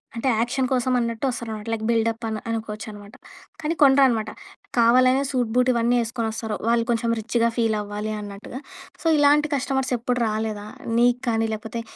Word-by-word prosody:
అంటే, 230 +3 -2
యాక్షన్ 250 +3 0
కోసం 255 0 +1
అన్నట్టు 230 +1 -2
వస్తారన్నమాట. 225 -3 -5
లైక్ 220 - -3
బిల్డప్ 230 0 0
అన్ 220 -1 -2
అనుకోవచ్చునమాట. 215 -1 -6 0.5
కానీ 315 +2 -1
కొనరనమాట. 265 -5 +5 0.5
కావాలనే 255 +3 +5
సూట్ 245 -4 0
బూట్ 250 0 +3
ఇవన్నీ 235 +1 +2
ఎసుకొని 230 0 -3
వస్తారు. 220 -1 -4
వాళ్ళు 235 0 +3
కొంచెం 235 0 +1
రిచ్‌గా 230 +1 +1
ఫీల్ 225 -2 +1
అవ్వాలి 210 +1 -4
అన్నట్టుగా. 205 +4 -8 0.4
సో, - - -22
ఇలాంటి 295 +1 +4
కస్టమర్స్ 265 -1 -1
ఎప్పుడు 245 +1 -1
రాలేదా? 215 -1 -3 0.3
నీకు 245 +1 +3
కానీ, 225 0 +1
లేకపోతే 225 +2 -5
230 Hz, 155 wpm, -23 LUFS, 220-250 Hz, 0.5 s, కొనరనమాట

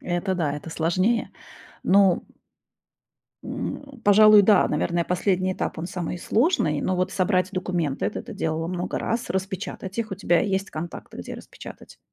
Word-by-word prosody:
Это 180 +2 -1
да, 155 -5 0
это 150 +2 -7
сложнее. 185 +9 +1 0.5
Ну 195 -2 +4 1.2
М, - - -4 0.2
пожалуй, 210 0 +8
да, 205 -1 +5
наверное, 170 +3 0
последний 185 +1 0
этап- - - -3
он 165 - -3
самый 180 -2 -4
сложный, 215 - +1
но 185 - 0
вот 185 +1 0
собрать 185 -1 +1
документы, 175 -6 -2
это - - -4
ты 230 -3 -9
делала 160 -3 -2
много 180 0 -3
раз, 235 +2 -2
распечатать 190 +1 -4
их. 220 -2 -2
У - - -1
тебя 175 -3 +2
есть 195 -2 -1
контакты, 170 +2 -7
где - - -6
распечатать? - - -12
185 Hz, 155 wpm, -24 LUFS, 170-200 Hz, 1.2 s, пожалуй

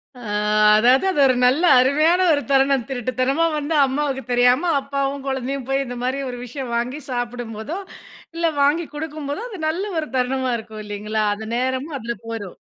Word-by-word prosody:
அ 245 - -12 0.6
அதாவது 250 - +4
அது 370 - -1
ஒரு 260 -1 +4
நல்ல 270 +8 +3 0.2
அருமையான 305 +7 +3
ஒரு 285 - +1
தருணம். 270 -2 +3
திருட்டுத்தனமா 255 +4 0
வந்து 300 +2 -2
அம்மாவுக்கு 270 0 -2
தெரியாம, 250 +7 +3
அப்பாவும் 275 0 -3
குழந்தையும் 265 0 -3
போய் 270 0 +1
இந்த 245 - -6
மாரி 260 +2 -1
ஒரு 245 - -6
விஷயம் 250 0 -6
வாங்கி 245 +5 -2
சாப்பிடும்போதோ, 245 - -4 0.6
இல்லை 335 -1 +1
வாங்கி 300 +4 +2
குடுக்கும்போதோ, 300 +1 -5
அது 400 -6 -8
நல்ல 350 +5 -2 0.2
ஒரு 305 - -4
தருணமா 255 0 0
இருக்கும் 220 -1 -9
இல்லைங்களா? 210 +1 -2
அந்த 220 +1 -8
நேரமும் 260 +4 -2
அதுல 235 0 -4
போயிரும். 220 -5 -6
265 Hz, 160 wpm, -21 LUFS, 245-290 Hz, 0.6 s, அதாவது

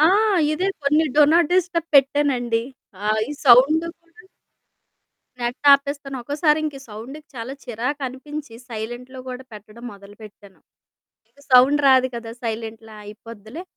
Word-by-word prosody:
ఆ! 310 - +6 0.5
ఇదే 365 +5 -1
కొన్ని 300 +3 +3
డు 300 - +7
నాట్ 335 -2 +4
డిస్టర్బ్ 350 -2 0
పెట్టానండి. 265 -4 +2 0.5
ఆహ్, 215 0 +1
ఈ - - -4
సౌండ్. 275 +6 +6 0.2
కూడా 340 +1 -20 1.2
నెట్ 240 +1 -3
ఆపేస్తాను, 280 -1 0
ఒక్కోసారి 300 +4 +1
ఇంక 300 -2 -3
ఈ - - -13
సౌండ్‌కి 250 +8 -10
చాలా 240 +2 -6
చిరాకు 250 +4 -4
అనిపించి 280 +1 -8
సైలెంట్‌లో 240 +3 -7
కూడా 255 +1 -7
పెట్టడం 215 +3 -13
మొదలుపెట్టాను. 205 0 -15 0.7
ఇగా 285 - -24
సౌండ్ 260 +4 +6
రాదు 260 -1 +5
కదా! 235 -1 -7
సైలెంట్‌లో 225 -1 -6
అయిపోద్దిలే, 220 - -11
255 Hz, 130 wpm, -21 LUFS, 225-295 Hz, 1.2 s, డు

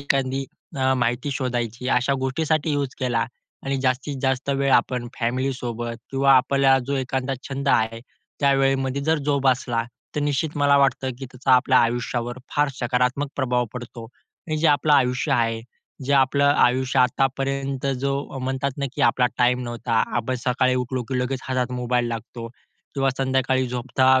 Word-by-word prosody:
एखादी 135 -1 0 0.3
अ, 130 0 +2
माहिती 120 +2 -1
शोधायची 120 -2 -3
अशा 130 +1 +2
गोष्टीसाठी 155 +3 0
यूज 140 -2 -2
केला 120 -3 0 0.4
आणि 135 0 0
जास्तीत 130 +2 -1
जास्त 135 +1 0
वेळ 135 -1 +1
आपण 120 0 +2
फॅमिलीसोबत 120 -1 -2
किंवा 135 0 +4
आपल्याला 135 +1 +4
जो 140 0 -1
एखादा 130 +1 -2
छंद 140 0 -3
आहे 115 -3 +2 0.4
त्यावेळेमध्ये 135 -1 +2
जर 160 +2 +1
जोपासला, 130 -4 +1 0.3
तर - - +1
निश्चित 145 +1 -1
मला 145 -1 +4
वाटतं 135 -1 +2
की 135 - -6
त्याचा 130 +1 -1
आपल्या 130 +1 +4
आयुष्यावर 120 +1 -1
फार 145 0 +2
सकारात्मक 125 +3 0
प्रभाव 125 -2 +1
पडतो 120 -1 -8
आणि 155 +6 -8
जे 165 - +2
आपलं 150 +1 +3
आयुष्य 125 -2 +2
आहे, 115 -1 +1 0.4
जे 140 - 0
आपलं 140 +1 +3
आयुष्य 130 +2 +2
आतापर्यंत 135 +1 0
जो 140 0 -2
म्हणतात 130 +1 -1
ना, 140 - -1
की 145 - -2
आपला 125 -3 +4
टाईम 125 0 +3
नव्हता. 120 -1 0
आपण 120 +2 -1
सकाळी 130 0 +2
उठलो, 125 0 -2
की 125 +3 -3
लगेच 130 +1 -2
हातात 125 -1 -1
मोबाईल 125 -1 0
लागतो 115 0 -6 0.5
किंवा 135 -1 +1
संध्याकाळी 130 -1 +1
झोपता 130 +2 +2
130 Hz, 155 wpm, -23 LUFS, 125-135 Hz, 0.5 s, किंवा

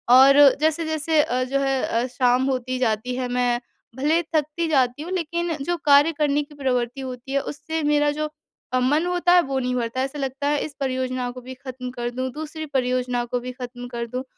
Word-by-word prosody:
और 270 +2 +8 0.3
जैसे-जैसे 315 -1 +1
अ, 255 -2 0
जो 275 +2 -1
है 270 -1 +1
अ, 235 +2 0
शाम 250 0 +2
होती 255 0 -2
जाती 245 0 0
है, 255 0 -2
मैं 245 -1 +1 0.4
भले 300 +6 +2
थकती 310 +2 0
जाती 260 -3 +2
हूँ 345 +4 -6
लेकिन 340 -1 -1
जो 345 +5 -1
कार्य 290 +2 +6
करने 295 -1 +2
की 295 +1 -16
प्रवृत्ति 250 -2 -1
होती 255 0 -7
है 275 - +2
उससे 315 +3 -4
मेरा 295 0 +3
जो 305 +1 -3 0.4
अ, 255 - +3
मन 290 +7 +2
होता 355 0 +2
है 355 - +7
वो 270 -4 -2
नहीं 250 -1 -1
भरता 240 +1 -2
है। 265 - +2
ऐसा 280 +2 -7
लगता 275 +1 -2
है 295 0 +2
इस 300 - -8
परियोजना 255 -2 -2
को 255 - -10
भी 255 +1 -8
ख़त्म 255 -1 -7
कर 240 -1 -3
दूँ, 255 +1 -3
दूसरी 315 +2 -6
परियोजना 250 -3 0
को 245 +1 -2
भी 250 +1 -6
ख़त्म 245 -1 -8
कर 235 -1 -4
दूँ। 250 +3 -4
265 Hz, 215 wpm, -23 LUFS, 250-295 Hz, 0.4 s, और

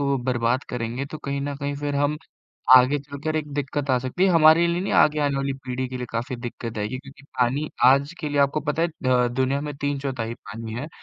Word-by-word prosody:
को 140 -1 +1
बर्बाद 120 +2 0
करेंगे 125 +3 -3
तो 155 - -8
कहीं 140 -1 -3
न 140 +1 -3
कहीं 145 0 -3
फिर 145 0 -3
हम 145 +1 +1 0.6
आगे 130 +3 +5
चलकर 145 +2 -5
एक 150 -2 -3
दिक्कत 145 0 -3
आ 130 - +4
सकती 130 +8 -1
है। - - +4
हमारे 165 +1 +6
लिए 170 +1 0
नहीं 195 - -2
आगे 150 0 +4
आने 145 -1 +1
वाली 135 0 -1
पीढ़ी 130 0 -2
के 130 0 -6
लिए 125 - -4
काफ़ी 115 +2 -3
दिक्कत 120 -2 -6
आएगी 105 +5 -2
क्योंकि 140 +1 -14 0.2
पानी 130 +5 +1 0.2
आज 140 +4 +4
के 150 - -3
लिए 145 - -1
आपको 140 +2 +2
पता 155 +2 0
है 170 - +3 0.2
द 125 -1 +3
दुनिया 130 +2 +1
में 150 0 -4
3 145 -1 -1
चौथाई 130 -5 -3
पानी 110 0 -8
है, 125 +6 -4
140 Hz, 235 wpm, -24 LUFS, 125-145 Hz, 0.6 s, हमारे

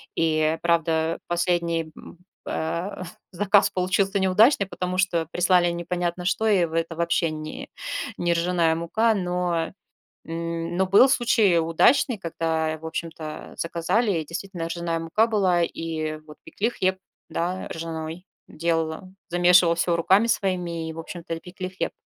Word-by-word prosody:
И 160 0 +1
правда 165 -1 +1
последний, 170 -2 0
м, 175 - -13 0.3
а, 170 +5 -3 0.3
заказ 200 +1 +3
получился 190 +2 +1
неудачный, 200 +3 +4
потому 185 -1 -3
что 170 -4 +1
прислали 180 -1 +3
непонятно 175 0 -3
что 220 +4 0
и 195 -5 +4
в 160 - -9
это 165 0 -1
вообще 170 -1 +1
ни 155 0 -7 0.5
не 175 0 +1
ржаная 170 -1 +2
мука. 220 +7 +1
Но, 180 -3 -1 0.5
м, 165 +1 -4
но 190 - +3
был 210 +8 +6
случай 215 -8 +3
удачный, 190 - +3
когда 160 -3 -2
в 160 - -9
общем-то, 160 -1 -5 0.3
а, - - -13
заказали, 175 +7 0
и - - -5
действительно 175 +1 -5
ржаная 170 -1 -2
мука 165 +7 +2
была, 190 -6 +2
и 160 -2 -3
вот 150 -1 -13
пекли 225 +4 -2
хлеб, 190 -4 0 0.3
да, 180 +2 -3
ржаной. 165 +1 -6 0.2
Делала, 165 +2 -2 0.2
замешивала 175 0 +5
всё 170 0 +1
руками 190 +6 +4
своими, 175 -6 -1
и - - -5
в 165 - -10
общем-то 165 0 -7
и 165 - -7
пекли 185 +1 -7
хлеб, 185 - -3
170 Hz, 145 wpm, -24 LUFS, 165-185 Hz, 0.5 s, был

